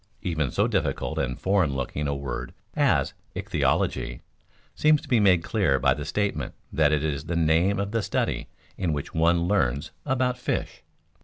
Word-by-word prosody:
Even 80 -6 0
so - - +1
difficult - - -1
and 65 -2 -2
foreign 95 -8 +2
looking 70 +3 -2
a 70 - -1
word 70 -3 -5 0.2
as - - +2 0.2
ichthyology - - 0 0.5
seems 155 0 +4
to - - -13
be 120 - +3
made 95 -5 +4
clear 95 - +2
by - - +3
the - - -6
statement 100 -10 -2 0.2
that 75 -2 +3
it 75 -1 +1
is 75 -2 -2
the 85 +1 -2
name 85 +5 +3
of 100 0 -2
the 115 0 +1
study - - -1 0.3
in 90 -4 0
which 70 -1 -4
one 85 +1 +3
learns 75 -6 +1
about 130 -2 0
fish. 125 - -3
85 Hz, 170 wpm, -26 LUFS, 70-100 Hz, 0.5 s, seems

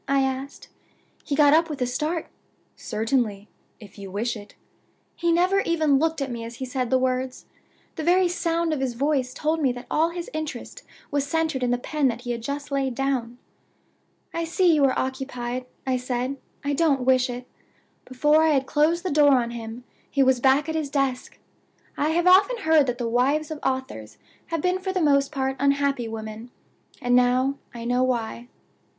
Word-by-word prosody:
I 275 0 +3
asked. 265 +1 -4 0.6
He 285 - -2
got 290 0 +5
up 330 +1 +4
with 295 -2 -5
a 250 - +1
start. 305 +7 -2 0.5
'Certainly, 220 -3 -1 0.3
if 205 -1 -14
you 195 -1 -8
wish 220 +6 -2
it.' 205 -1 -11 0.6
He 340 -1 0
never 365 +4 +3
even 315 -7 +2
looked 320 -1 0
at 270 - -5
me 235 -1 -5
as 230 +1 -8
he 260 - -5
said 255 -1 -2
the 260 - +4
words. 255 0 -2 0.5
The 315 - -3
very 360 +2 +4
sound 335 -1 0
of 300 - -2
his 260 -3 -2
voice 270 -1 0
told 310 +4 -1
me 270 -4 +3
that 245 0 -9
all 320 +2 +3
his 340 0 -6
interest 310 -1 -5 0.3
was 285 -1 0
centered 320 -3 0
in 250 - +1
the 245 - +2
pen 290 +3 0
that 235 -1 -2
he 245 -1 -4
had 235 -1 -3
just 285 +4 -5
laid 270 -2 -1
down. 250 -3 -1 1.0
'I 335 - -2
see 350 +1 +3
you 295 -2 +3
are 260 - +1
occupied,' 255 -2 -3 0.2
I 260 -1 +1
said; 250 +2 -3 0.3
'I 285 - 0
don't 285 -3 +2
wish 255 0 +3
it.' 245 0 -6 0.6
Before 295 +5 +3
I 320 -1 +4
had 270 -1 +1
closed 310 +5 +1
the 365 - -1
door 290 -1 +5
on 240 -2 +1
him 230 +1 -7 0.3
he 275 - +2
was 260 -1 +3
back 270 +4 +3
at 320 - -2
his 310 -3 -2
desk. 275 -3 -2 0.6
I 295 - 0
have 340 +2 +1
often 395 +7 +5
heard 315 -3 +4
that 245 -1 -1
the 240 -2 -2
wives 275 +7 +1
of 310 - -5
authors 260 - -3 0.3
have 330 -2 -2
been 365 +2 +1
for 380 0 -3
the 375 - -1
most 280 -3 +3
part 265 -2 -2
unhappy 280 -3 +1
women. 220 +1 -7 0.5
And 245 -2 +2
now 255 +2 +2
I 235 -2 -8
know 245 +1 +1
why. 240 -2 -1
270 Hz, 195 wpm, -24 LUFS, 245-310 Hz, 1.0 s, got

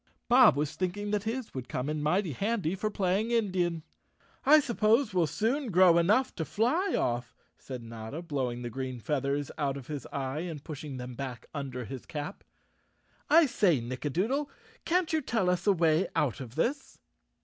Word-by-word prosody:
Bob 245 - +7
was 150 0 -1
thinking 205 +3 -2
that 210 0 -1
his 235 +1 -3
would 130 -2 -6
come 125 +2 -2
in 150 0 -2
mighty 170 +4 +1
handy 195 - -1
for 215 +3 -2
playing 200 +2 0
Indian. 185 -8 0 0.6
"I 305 +2 +9
suppose 230 -3 +2
we'll 175 -3 +3
soon 245 - -1
grow 180 -2 +6
enough 210 +10 +3
to 160 - -1
fly 255 - +1
off," 120 0 -1 0.2
said 125 -3 -7
Notta, 115 +7 -7
blowing 130 -7 -2
the 120 - -4
green 130 0 -4
feathers 140 +4 -1
out 140 -2 0
of 135 - -9
his 145 0 -6
eye 135 +1 -3
and 160 -4 -5
pushing 145 -3 -7
them 125 0 -6
back 125 -2 -6
under 130 -4 -4
his 130 +1 -8
chap. 150 +6 -6 0.9
"I 325 +1 +7
say, 190 - +2
Nicka 130 +5 -4
doodle, 255 - 0 0.4
can't 350 -1 +1
you 315 - +2
tell 210 -9 +1
us 180 +2 -2
a - - +7
way 165 -1 +3
out 135 -7 +1
of 125 -2 -8
this?" 265 - -1
170 Hz, 180 wpm, -29 LUFS, 135-215 Hz, 0.9 s, I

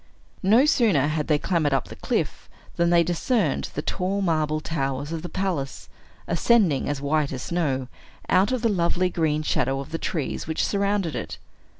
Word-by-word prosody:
No 220 +8 +5
sooner 215 - +3
had 155 -1 -1
they 150 - +3
clambered 150 -3 +1
up - - -2
the - - -8
cliff, - - -2 0.3
than 170 0 +2
they 170 -1 +5
discerned 195 +7 0
the - - -2
tall 195 +2 -1
marble 155 -3 +1
towers 140 -2 -3
of 165 -1 -3
the 175 - -6
palace, 180 -8 -3 0.4
ascending, 170 - +2
as 145 -1 -2
white 145 +1 0
as 130 -2 -5
snow, 140 -7 -1 0.4
out 190 +4 +3
of 255 -2 -1
the - - +4
lovely 180 -1 +1
green 155 -3 0
shadow 135 -2 0
of 140 - -7
the 165 - -3
trees 155 -3 -3
which 160 - 0
surrounded 200 -4 0
it. - - -5
165 Hz, 180 wpm, -24 LUFS, 145-190 Hz, 0.4 s, No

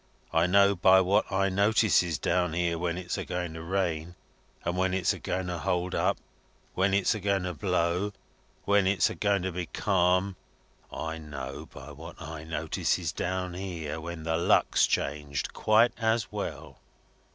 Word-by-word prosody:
I 80 +2 +3
know 100 +2 +5
by 95 +1 +6
what 95 +3 +2
I 95 0 +2
notices 100 - +3
down 90 +1 0
here, 85 0 0
when 85 0 -1
it's 90 -1 -4
a - - -2
going 90 -2 -4
to 80 - -7
rain, 85 -1 -2 0.5
when 90 +2 0
it's 95 -2 +2
a - - -8
going 95 0 -2
to 90 -1 -3
hold 90 0 -1
up, - - +1 0.6
when 95 +1 +2
it's 100 0 +3
a 110 - -4
going 100 -1 0
to 90 0 -3
blow, 90 +4 0 0.5
when 100 -1 +3
it's 95 -3 +2
a - - -4
going 100 -2 +1
to 95 - -1
be 90 -1 -4
calm. 90 0 +1 0.5
I 80 0 -4
know, 70 -4 -7
by 70 +2 -10
what 80 +4 -11
I 80 -1 -7
notices 80 -1 -1
down 90 0 -3
here, 85 -4 -5
when 85 -1 -6
the 80 0 0
luck's 85 - +3
changed, 70 -1 -2
quite 110 +3 +4
as 110 -1 0
well." - - -6
90 Hz, 170 wpm, -28 LUFS, 85-95 Hz, 0.6 s, by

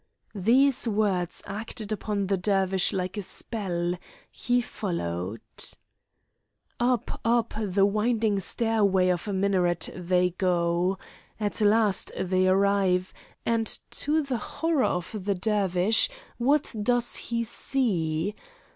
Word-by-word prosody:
These 240 +6 +3
words 200 -5 0
acted 215 +1 -5
upon 205 -1 -1
the 195 +1 +1
Dervish 190 -1 +1
like 185 +1 -3
a - - -1
spell; 180 -4 -3 0.3
he 245 +1 +1
followed. 105 - -3 1.4
Up, 240 -1 0
up, 235 0 +2
the 200 -2 +2
winding 215 0 +1
stairway 200 -3 +1
of 180 +2 -1
a 205 - -2
minaret 185 -3 +1
they 180 0 +1
go. 175 +1 +1 0.4
At 210 +1 -2
last 210 -1 +3
they 185 0 +2
arrive, 190 -1 +2 0.3
and 230 -1 +1 0.2
to 305 +2 +1
the 260 -4 -2
horror 325 0 0
of 180 +4 -2
the 200 -1 +1
Dervish, 200 - +3 0.3
what 280 +4 +2
does 240 +2 +1
he 235 0 -2
see? 200 - -1
200 Hz, 115 wpm, -27 LUFS, 180-225 Hz, 1.4 s, These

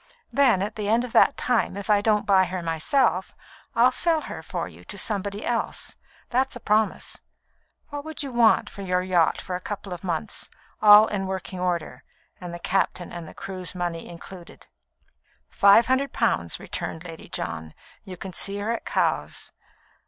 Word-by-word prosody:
Then, 250 -9 +4
at 210 +2 -5
the 210 -1 -2
end 230 +2 +3
of 250 - -6
that 280 - +5
time, 235 -5 0
if 200 - -6
I 205 -1 +4
don't 210 -1 +2
buy 190 -2 +5
her 180 0 -4
myself, 175 - +1 0.4
I'll 240 +2 +5
sell 325 +3 +1
her - - -7
for - - -4
you - - -14
to - - -8
somebody 205 -2 -2
else; 235 -2 -2 0.4
that's 260 +2 +1
a - - -7
promise. 215 -1 0 0.7
What 290 -1 -5
would 315 -1 -5
you 275 - -5
want 235 -2 +4
for 200 - -9
your 180 -1 0
yacht 175 -3 +2
for 185 - -4
a 180 - -4
couple 200 -1 -5
of 175 - -8
months, 180 +3 -3 0.3
all 210 0 +9
in 195 -3 -3
working 190 -1 -5
order, 175 -3 -2 0.4
and 180 -1 -7
the 175 - -6
captain 180 0 -1
and 170 -2 -8
crew's 185 -1 -6
money 175 -2 -3
included?" 175 +1 -12 0.9
"Five 200 +4 +6
hundred 265 +2 +1
pounds," 85 -1 0
returned 160 - -5
Lady 165 -2 -10
John. 80 -1 -4 0.3
"You 185 -3 -9
can 190 +1 -7
see 200 +3 0
her 205 +3 -2
at 235 - -3
Cowes." - - -1
200 Hz, 175 wpm, -25 LUFS, 180-225 Hz, 0.9 s, all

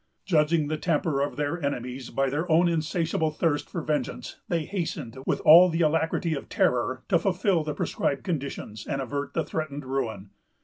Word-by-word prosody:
Judging 155 -3 +2
the 155 0 -2
temper 150 -4 0
of 145 - -1
their 150 +3 -2
enemies 125 -2 -3
by 135 0 0
their 155 +6 -2
own 170 +3 +5
insatiable 165 -1 0
thirst 155 -1 -1
for 170 - -4
vengeance, 150 -1 -3
they 165 -3 -1
hastened, 155 - -4
with - - 0
all 175 +4 +8
the 165 0 -1
alacrity 160 +1 +1
of 140 - -6
terror, 130 +1 +1
to 170 - +3
fulfil 185 -2 +1
the 150 -1 -4
prescribed 140 -2 -1
conditions, 140 - -4
and 135 - -2
avert 140 +2 -4
the 165 - 0
threatened 145 -3 -4
ruin. 115 -7 -3
155 Hz, 175 wpm, -26 LUFS, 140-165 Hz, -, all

